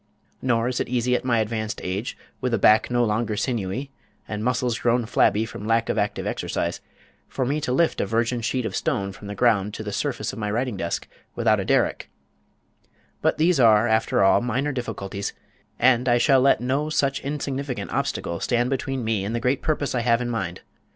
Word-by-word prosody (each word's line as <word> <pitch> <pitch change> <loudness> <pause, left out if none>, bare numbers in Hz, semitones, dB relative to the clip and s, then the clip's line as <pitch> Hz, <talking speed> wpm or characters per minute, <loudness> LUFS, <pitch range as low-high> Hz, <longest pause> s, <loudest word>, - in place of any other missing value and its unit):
Nor 120 -2 +1
is 125 0 -1
it - - -2
easy 125 0 +1
at - - -1
my 125 -2 +2
advanced 110 0 -2
age, 95 +6 -3 0.2
with 125 -2 +1
a - - 0
back 110 +2 +5
no 120 0 +2
longer 110 0 -1
sinewy, 120 +4 -2 0.4
and 105 0 -4
muscles 125 -1 0
grown 120 0 +2
flabby 110 0 +2
from 105 -1 -8
lack 115 0 +2
of - - 0
active - - -1
exercise, - - -2 0.5
for 130 - -2
me 145 +4 -1
to 140 - -2
lift 160 +6 +2
a - - -1
virgin 115 +3 0
sheet 125 +1 -1
of - - -3
stone 100 0 -1
from 100 +1 -11
the 105 - -5
ground 105 -2 +2
to 110 - -5
the 105 - -4
surface 120 -2 -2
of - - -7
my 105 -1 -2
writing 120 +2 -1
desk 85 -3 -3 0.3
without - - +2
a - - -2
derrick, - - +1 1.1
but - - +2
these 165 0 +3
are, 110 -2 +5
after 110 -2 +2
all, 95 - +5
minor 130 +5 -1
difficulties, 100 -6 -4 0.4
and 125 0 +3
I 120 - +5
shall 135 +1 +4
let 135 -1 +4
no 135 +5 0
such 140 -3 +1
insignificant 140 -2 -4
obstacles 85 0 -2
stand 120 +1 +1
between 135 -1 -2
me 110 -3 0
and 105 +4 -3
the - - 0
great 125 +3 0
purpose 150 -3 -1
I 125 - +1
have 115 0 +3
in 120 -1 -2
mind. 115 - -3
120 Hz, 205 wpm, -24 LUFS, 110-130 Hz, 1.1 s, back